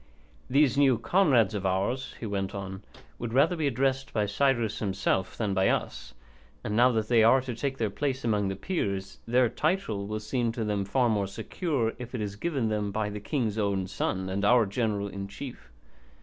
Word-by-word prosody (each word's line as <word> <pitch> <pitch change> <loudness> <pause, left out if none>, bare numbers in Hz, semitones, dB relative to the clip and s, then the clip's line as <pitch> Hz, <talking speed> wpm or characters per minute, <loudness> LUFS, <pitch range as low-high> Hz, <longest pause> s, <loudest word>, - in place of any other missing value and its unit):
These 140 +1 +3
new 135 -4 +5
comrades 135 - +3
of 100 -2 -3
ours," 100 +8 -1
he - - -5
went 100 -2 -3
on, 95 -1 -6 0.4
"would 115 -1 -4
rather 150 +7 +4
be 155 -3 0
addressed 135 +1 0
by 105 -2 +1
Cyrus 115 0 +1
himself 95 -2 -1
than 105 -4 -1
by 95 0 +2
us, - - -2 0.5
and 105 - -2
now 125 +3 +5
that 110 -1 0
they 115 -1 +4
are 115 +4 +6
to 125 -1 -5
take 135 +3 -3
their 110 -4 -1
place 135 +2 -2
among 105 -3 +1
the 95 - -2
Peers 100 - -3
their 125 +1 +4
title 115 - -1
will 105 +1 -3
seem 115 +2 -1
to 115 - -3
them 105 -2 -1
far 125 +5 +2
more 105 -3 +1
secure 115 - -2
if 125 0 -7
it - - -3
is 100 -1 -3
given 135 -1 -1
them 105 -1 -1
by 105 0 -2
the 105 - -5
king's 110 -2 -1
own 100 -2 0
son 95 0 -2
and 95 +2 -2
our 115 +2 +5
general 100 -1 -1
in 100 0 -6
chief. 120 +6 -9
110 Hz, 200 wpm, -28 LUFS, 100-130 Hz, 0.5 s, are